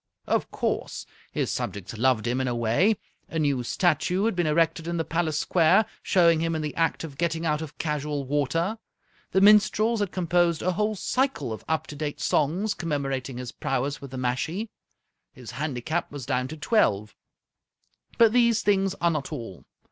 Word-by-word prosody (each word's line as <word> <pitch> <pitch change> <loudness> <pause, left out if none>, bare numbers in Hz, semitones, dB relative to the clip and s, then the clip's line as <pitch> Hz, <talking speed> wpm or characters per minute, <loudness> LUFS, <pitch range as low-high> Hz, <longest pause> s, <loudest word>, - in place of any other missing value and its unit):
Of - - 0
course, - - -3 0.3
his - - -1
subjects 100 +2 -4
loved 120 -1 +2
him 125 +2 0
in 130 - -1
a 120 - -1
way. 120 - +2 0.3
A 165 - -4
new 145 -5 +1
statue 175 - +1
had 225 - +1
been 175 -2 +1
erected 165 +1 +1
in 170 0 -2
the 165 - -1
palace 165 -2 -1
square, 180 +6 +4 0.2
showing 170 -3 +4
him 165 0 0
in 155 - -2
the 150 - -3
act 165 0 0
of 145 -4 -8
getting 165 -1 -1
out 150 -1 0
of 155 -2 -8
casual 150 -2 -2
water. 150 - 0 0.5
The 190 - +2
minstrels 215 +2 +5
had 205 -3 -1
composed 175 -2 +1
a 185 - +2
whole 210 +4 0
cycle 250 - -1
of 110 - -8
up 160 -1 0
to 150 - -9
date 145 0 -4
songs, 180 +9 +1
commemorating 135 -5 -3
his 125 -1 -6
prowess 135 +2 -2
with 140 - -8
the 130 - -7
mashie. 155 - -2 0.6
His 125 -3 -10
handicap 150 +4 -3
was 140 -4 -7
down 125 -2 0
to 155 - -8
twelve. 105 - +1 1.0
But 225 -2 +6
these 235 -2 +3
things 195 -1 +2
are 170 -1 +3
not 150 -3 -3
all. 115 - -7
155 Hz, 180 wpm, -26 LUFS, 135-180 Hz, 1.0 s, But